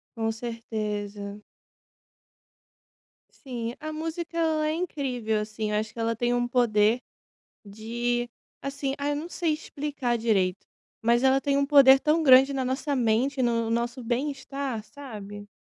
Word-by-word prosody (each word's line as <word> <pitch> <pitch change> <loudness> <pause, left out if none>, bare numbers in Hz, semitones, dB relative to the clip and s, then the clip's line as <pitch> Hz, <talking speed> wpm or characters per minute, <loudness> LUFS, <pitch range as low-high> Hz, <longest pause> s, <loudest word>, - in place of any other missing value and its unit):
Com 225 -1 0
certeza. 210 -3 -5 1.9
Sim. 240 -4 -5
A 310 +1 -5
música 325 +2 -5
ela 315 -2 +1
é - - 0
incrível, 255 -10 -2
assim, 215 0 -3
eu 210 - 0
acho 215 0 -2
que - - -14
ela 230 0 0
tem 240 +2 0
um 245 0 0
poder 235 -2 +3 0.7
de, 240 +4 -2 0.3
assim, 275 0 -3
ai 285 +1 -1
eu - - 0
não 310 +4 -5
sei 335 -3 0
explicar 285 -5 -3
direito, 195 -5 +1 0.4
mas 235 +2 +3
ela 265 0 +5
tem 280 0 +1
um 280 - +2
poder 275 -2 +7
tão 310 +3 +2
grande 265 0 +7
na 265 -1 -1
nossa 275 +3 -1
mente 250 +3 +1
e - - +3
no 230 -1 +1
nosso 235 +2 -1
bem-estar, 270 -1 -3
sabe? 205 -6 -9
245 Hz, 150 wpm, -27 LUFS, 225-280 Hz, 1.9 s, poder